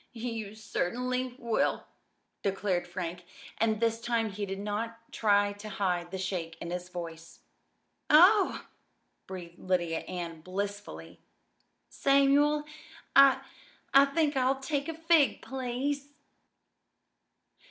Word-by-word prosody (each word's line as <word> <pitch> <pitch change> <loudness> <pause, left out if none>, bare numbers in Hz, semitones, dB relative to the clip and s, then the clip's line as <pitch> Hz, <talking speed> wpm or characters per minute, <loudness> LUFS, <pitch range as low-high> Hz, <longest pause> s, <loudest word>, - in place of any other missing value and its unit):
"You 225 -3 -5
certainly 250 +4 -2
will!" 235 -3 0 0.6
declared 190 -3 -1
Frank. 175 0 -5 0.4
And 220 -1 +2
this 230 0 +1
time 230 -2 0
he 200 +1 -4
did 195 0 -4
not 210 +3 -2
even 230 - -17 0.2
try 205 -1 +2
to 205 +1 -9
hide 180 -4 -1
the 190 - -5
shake 180 -3 -3
in 170 - -6
his 180 0 -4
voice. 170 -2 -8 0.7
"Oh!" 370 +6 +6 0.6
breathed 175 -2 -9
Lydia 175 -3 0
Ann 170 -3 -6
blissfully. 200 +4 -5 0.7
"Samuel, 280 +2 +3 0.5
I 275 -1 +7 0.5
I 275 +1 +8
think 295 +1 0
I'll 265 +1 +2
take 280 +2 -2
a 325 - -4
fig, 325 -3 +3
please!" 265 +2 -3
215 Hz, 115 wpm, -30 LUFS, 185-270 Hz, 0.7 s, I